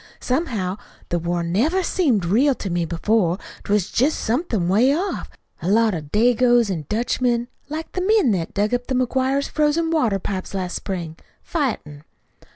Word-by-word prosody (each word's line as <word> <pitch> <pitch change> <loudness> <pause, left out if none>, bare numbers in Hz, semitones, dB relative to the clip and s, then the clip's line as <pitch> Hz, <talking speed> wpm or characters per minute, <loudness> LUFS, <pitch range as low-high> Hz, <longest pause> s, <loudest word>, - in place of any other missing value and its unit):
"Somehow, 225 - -1 0.3
the 175 - 0
war 170 +1 -1
never 260 - +1
seemed 265 - +1
real 255 +10 +3
to 195 - -5
me 170 -1 0
before. 175 +2 +1 0.3
'T - - -5
was 205 -3 +1
jest 275 +6 +2
somethin' 225 - -1
'way 235 +10 +4
off 380 +5 -3 0.3
a - - -3
lot 220 +1 +4
of 150 -4 -6
Dagoes 240 0 +4
an' 160 -5 -3
Dutchmen, 240 +1 0 0.2
like 315 +2 -5
the 365 - -3
men 395 - +3
what 165 -3 -4
dug 210 +3 +1
up 245 0 -1
the 260 - -1
McGuires' 260 +2 +1
frozen 310 +2 +1
water 245 -11 +2
pipes 190 0 -5
last 185 -2 -3
spring, 170 -5 -4 0.3
fightin'. 215 - -3
230 Hz, 165 wpm, -22 LUFS, 185-275 Hz, 0.3 s, way